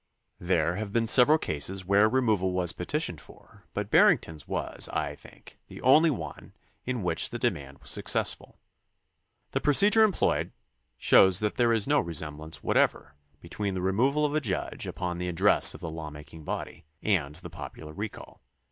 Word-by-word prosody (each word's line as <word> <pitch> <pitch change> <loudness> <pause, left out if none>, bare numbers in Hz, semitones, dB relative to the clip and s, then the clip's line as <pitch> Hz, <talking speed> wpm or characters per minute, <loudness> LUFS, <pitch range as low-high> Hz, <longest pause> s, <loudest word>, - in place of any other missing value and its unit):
There 85 -1 0
have 105 -1 -5
been 115 +1 +1
several 130 +7 +6
cases 95 - -3
where 100 +3 +4
removal 110 -7 0
was 90 -2 +2
petitioned 90 - -3
for, - - -19
but - - -5
Barrington's 80 -3 +2
was, - - -2
I - - -3
think, - - -16
the - - -11
only 155 +6 +5
one 80 - -7 0.3
in 125 -5 -2
which 90 - 0
the - - -5
demand 70 -1 -3
was - - -4
successful. - - 0 0.9
The - - -2
procedure 205 +10 +5
employed 210 -4 0 0.4
shows 95 -2 +5
that 105 -1 -1
there 120 -1 +1
is 110 -3 0
no 145 0 +3
resemblance 80 -2 -3
whatever 70 - 0 0.3
between 100 +3 -4
the 90 - -3
removal 130 +11 +1
of 145 - -2
a 155 - 0
judge 100 -8 -4
upon 90 -1 -4
the 90 0 -3
address 95 +4 +4
of - - -12
the 80 - -5
law 80 -1 -7
making 75 +1 -13
body 85 - -6 0.2
and 75 -9 0
the 85 0 -10
popular 75 0 -10
recall. 105 +5 -8
95 Hz, 165 wpm, -27 LUFS, 80-120 Hz, 0.9 s, several